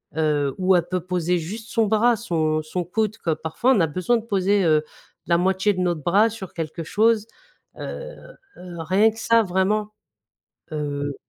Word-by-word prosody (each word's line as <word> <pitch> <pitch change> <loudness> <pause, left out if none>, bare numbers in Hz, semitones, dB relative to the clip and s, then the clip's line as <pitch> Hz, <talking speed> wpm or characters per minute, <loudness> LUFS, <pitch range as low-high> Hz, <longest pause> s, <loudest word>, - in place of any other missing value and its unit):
heu, 150 -3 +1
où 185 0 +4
elle 175 -1 +1
peut 185 0 -1
poser 180 -1 0
juste 215 +8 -7
son 225 -2 +2
bras, 225 +3 +3
son 160 -8 -1
son 175 +4 -4
coude, 215 +5 -2
que 165 - -2
parfois 160 +12 0
on 215 - +2
a 165 - +3
besoin 185 +10 0
de 225 - -7
poser, 200 -1 +1
heu, 155 -2 +3 0.4
la 170 0 +2
moitié 190 +3 +2
de 185 - -5
notre 175 -3 0
bras 200 +7 +4
sur 205 -5 -9
quelque 165 0 -5
chose, 215 +5 +2 0.5
heu - - -6 0.4
heu, 175 -2 -8
rien 190 +7 +3
que 225 +1 -9
ça 230 0 +4
vraiment, 210 +2 0 0.8
heu 145 -2 -3
185 Hz, 180 wpm, -23 LUFS, 165-215 Hz, 0.8 s, où